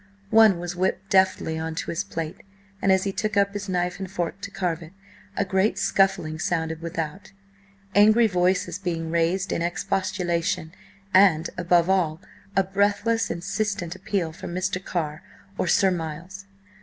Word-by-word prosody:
One 220 -4 +6
was 175 0 -5
whipped 190 +2 -1
deftly 185 -4 +2
on 160 0 -4
to - - -3
his 170 +4 -1
plate, 165 -5 -5 0.4
and 195 - +3
as 190 0 +3
he 195 - -1
took 215 +1 -2
up 200 0 +3
his 205 -1 -5
knife 180 0 -1
and 190 -1 -5
fork 175 0 -3
to 200 - -5
carve 180 -4 -2
it, 165 +2 -11 0.4
a 200 - +1
great 190 +3 +1
scuffling 160 -5 +1
sounded 160 -1 -1
without, 165 +3 -5 0.6
angry 215 +3 +6
voices 180 -1 +1
being 165 -4 -3
raised 170 +4 +1
in - - -1
expostulation, 175 -1 -1 0.4
and, 180 -4 +5
above 175 -1 +3
all, 175 -5 +1 0.4
a 195 - +4
breathless, 205 +3 +1
insistent 190 0 -2
appeal 185 -3 -2
for - - -8
Mr. 185 +1 -2
Carr 155 -4 -3 0.3
or - - -1
Sir 190 -1 +4
Miles. 175 +4 -5
185 Hz, 155 wpm, -25 LUFS, 170-195 Hz, 0.6 s, One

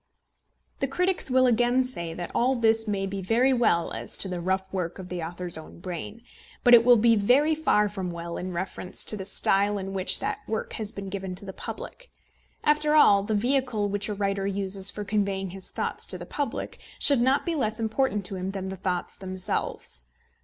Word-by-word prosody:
The 275 - 0
critics 360 +4 0
will 255 0 +4
again 245 +1 +3
say 170 -10 -4
that 175 0 -6
all 255 +2 +2
this 225 -1 +2
may 200 -2 -1
be 195 0 -4
very 235 +7 +2
well 225 -9 +2
as - - -4
to - - -1
the 180 -2 -4
rough 190 +2 0
work 180 -3 -3
of 185 -2 -9
the 180 -1 -4
author's 170 0 -2
own 160 - -12
brain, 185 +6 -7 0.4
but 245 - +6
it 235 -1 +9
will 245 0 +6
be 230 +1 +4
very 255 +9 +3
far 255 -9 +2
from 195 -3 -4
well 170 0 -6
in 185 +1 -4
reference 180 +1 -2
to - - +7
the 190 -2 -6
style 200 +1 +2
in 195 0 -5
which 190 -1 +2
that - - -2
work 220 0 -3
has 215 -2 -3
been 200 -3 -7
given 190 -2 -5
to 195 - -6
the 190 - -7
public. - - -8 0.5
After 300 0 +2
all, 200 -9 +6
the 210 +2 -2
vehicle 240 -2 0
which 205 +1 -1
a 210 - -2
writer 195 -1 -1
uses 195 0 -1
for 210 - -3
conveying 195 -2 -1
his 190 0 -5
thoughts - - -3
to - - -1
the - - -8
public 285 -1 -4 0.2
should 280 -4 +5
not 260 +3 +2
be 340 - -1
less 225 -7 -1
important 220 -2 0
to 190 - -3
him 185 +1 -3
than 195 -1 -5
the 190 - -6
thoughts 180 -1 -3
themselves. 185 - -4
200 Hz, 210 wpm, -26 LUFS, 190-240 Hz, 0.5 s, it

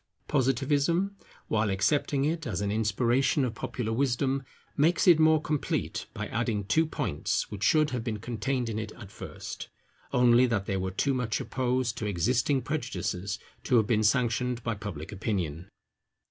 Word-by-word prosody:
Positivism, 145 +8 +1 0.3
while 110 -1 +1
accepting 135 +8 +1
it 165 0 -1
as 105 -7 -2
an 100 0 -1
inspiration 120 +6 +2
of 120 - -3
popular 110 0 -3
wisdom, 135 +2 +1 0.3
makes 160 +5 +3
it 170 -3 +8
more 155 0 +5
complete 150 -1 -2
by - - -3
adding 110 -3 -1
two 160 +11 +2
points 130 - -2
which 100 - -6
should 155 +5 +4
have 125 -3 -2
been 115 -3 -2
contained 120 +3 -2
in 110 -1 -2
it 110 -1 -5
at 105 -5 -11
first, - - -8 0.4
only 125 0 +5
that 110 -5 0
they 95 - -1
were 95 0 -1
too 135 +9 0
much 125 -4 -1
opposed 125 -2 -1
to 105 - -2
existing 120 - +1
prejudices 100 - -3 0.3
to 130 - +2
have 110 -3 +5
been 110 0 +2
sanctioned 120 +1 +1
by 115 - -1
public 100 -7 -6
opinion. 95 -5 -3
120 Hz, 160 wpm, -28 LUFS, 105-135 Hz, 0.4 s, it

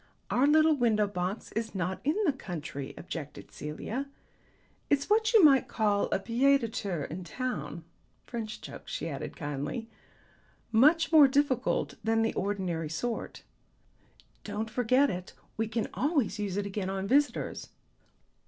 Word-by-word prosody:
"Our 260 +3 +4
little 310 +1 +5
window 225 -5 +2
box 195 +1 -4
is 225 -1 -3
not 185 +1 -2
in 300 +4 +1
the 300 - +3
country," 155 - -6
objected 150 -4 -7
Celia. 220 - -5 0.8
"It's 285 +7 +1
what 440 +1 +4
you 445 -5 +7
might 275 -4 +6
call 205 -2 +1
a - - 0
pied 265 +7 +3
de 230 - -2
terre 190 -8 -3
in 180 +4 -6
town. 175 - -4 0.4
French 220 -3 -5
joke," - - -10
she - - -4
added 140 -4 -6
kindly. 150 - -4 0.8
"Much 305 +9 +5
more 305 -4 +9
difficult 265 -2 +1
than 225 0 +2
the 225 - 0
ordinary 185 -5 -2
sort." 230 +10 -4 1.0
"Don't 215 +2 -4
forget 255 +3 +3
it; 180 0 -6 0.2
we 225 0 -1
can 225 0 -2
always 270 - 0
use 200 -2 -2
it 205 - -1
again 195 -1 -3
on 195 0 -3
visitors. 285 +5 +1
220 Hz, 145 wpm, -29 LUFS, 185-270 Hz, 1.0 s, more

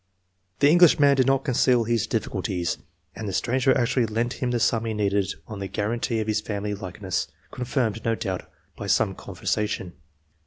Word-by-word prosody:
The 145 - +7
English 175 -1 +7
man 140 -1 +6
did 130 -1 +3
not 135 0 +2
conceal 125 -2 +3
his 115 -1 0
difficulties, 90 -2 -2 0.4
and 110 - -5
the 100 - -3
stranger 130 +6 +2
actually 120 0 +1
lent 115 +3 -1
him 125 - +1
the 120 -1 0
sum 115 0 +2
he 110 -1 -2
needed 100 -2 0
on 105 -2 -7
the 100 - -3
guarantee 115 +4 -1
of 110 - -1
his 105 0 +1
family 105 -1 -3
likeness, 95 -3 -3 0.2
con 125 - -5
firmed, 115 -4 -1
no 115 -1 +1
doubt, 95 -4 -4 0.3
by - - -6
some - - +2
conversation. 105 -4 -3
115 Hz, 185 wpm, -25 LUFS, 105-125 Hz, 0.4 s, The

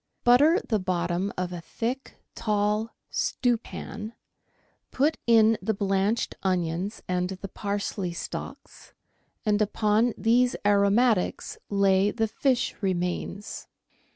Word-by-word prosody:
— - - -51
Butter 290 +9 +6
the 215 -3 +1
bottom 180 +1 -1
of 180 0 -2
a 175 - -6
thick, 245 +9 -4 0.2
tall 210 +1 0 0.2
stewpan, 225 -3 -2 0.8
put 300 +4 +1
in 225 -1 +5
the 220 - -1
blanched 195 +3 0
onions 185 +2 -1
and 180 0 0
the 190 +1 -6
parsley 200 -2 -3
stalks, 170 - -8 0.5
and 210 0 +2
upon 215 +2 +2
these 245 +2 +3
aromatics 205 +1 +2
lay 195 0 +3
the 225 +1 0
fish 245 +3 0
remains. 185 +2 -3
205 Hz, 110 wpm, -26 LUFS, 190-225 Hz, 0.8 s, Butter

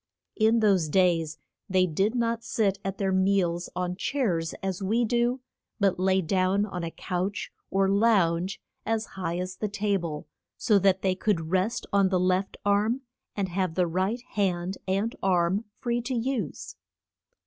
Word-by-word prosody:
In 225 +1 +3
those 190 -7 +3
days 165 -3 +2 0.3
they 185 -1 +4
did 195 +7 0
not 230 -1 0
sit 200 -3 0
at 195 0 -3
their 195 -1 0
meals 185 -2 +1
on 180 0 -2
chairs 180 -9 -1
as 190 0 -2
we 225 +5 +1
do, 240 +2 +1 0.4
but 195 -3 +2
lay 190 0 +2
down 185 +4 +2
on 180 -4 -5
a 165 - -2
couch, 185 +4 -3 0.2
or 195 0 +2
lounge, 195 -4 +2 0.2
as 225 -1 -1
high 175 -2 -3
as 185 +1 -4
the 215 - -1
ta 205 0 0
ble, 155 -3 -5 0.3
so 210 -3 +3
that 190 -1 +2
they 190 -1 +3
could 180 -4 -1
rest 190 +5 0
on 200 -1 +4
the 185 -1 +2
left 185 +1 0
arm, 210 +5 +2 0.3
and 195 -2 -1
have 180 -2 -1
the 180 - +3
right 190 +8 -1
hand 185 -2 -1
and 200 +5 0
arm 185 +3 +2
free 240 -1 -1
to 250 +2 -3
use. 235 - -3
195 Hz, 165 wpm, -27 LUFS, 180-215 Hz, 0.4 s, they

